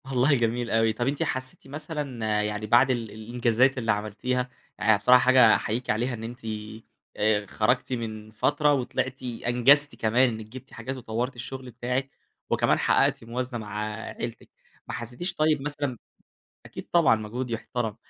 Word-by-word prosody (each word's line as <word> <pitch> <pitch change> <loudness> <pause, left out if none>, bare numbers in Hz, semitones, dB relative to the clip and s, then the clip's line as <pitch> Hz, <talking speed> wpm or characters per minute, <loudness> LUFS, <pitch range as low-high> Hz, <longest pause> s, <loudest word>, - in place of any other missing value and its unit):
والله 135 +2 +2
جميل 120 -1 0
أوي، 115 0 +3
طب 120 +3 -2
أنتِ 140 +1 0
حسيتِ 130 +1 -4
مثلًا، 135 -8 -3
يعني 105 0 -3
بعد 120 +4 +5
ال 115 -4 -2
الإنجازات 120 +4 +1
اللي 115 -3 +1
عملتيها، 120 +5 -2 0.3
يعني 105 +1 +4
بصراحة 125 +5 +6
حاجة 125 -4 +7
أحييكِ 120 +4 -3
عليها، 120 +4 0
إن 115 -2 -6
أنتِ 120 +2 -7 0.8
آآ 105 -1 +2
خرجتِ 125 +6 0
من 110 -2 -5
فترة، 145 +6 +2
وطلعتِ 130 0 -2
أنجزتِ 125 +4 +3
كمان 120 +4 +3
إنك 110 -2 -6
جبتِ 130 +4 -12
حاجات، 130 +3 -5
وطورتِ 120 +2 -3
الشغل 130 +1 -7
بتاعك، 125 +3 -2 0.4
وكمان - - +2
حققتِ - - +2
موازنة 120 +1 -4
مع 105 -1 -5
عيلتِك. 110 +1 -7 0.4
ما - - -5
حسيتيش 120 - -4
طيب 155 -2 +2
مثلًا 145 -3 -3 0.7
أكيد - - -9
طبعًا، 165 -9 +5
مجهود 115 +4 -5
يحترم، 115 -1 -3
120 Hz, 155 wpm, -26 LUFS, 110-130 Hz, 0.8 s, حاجة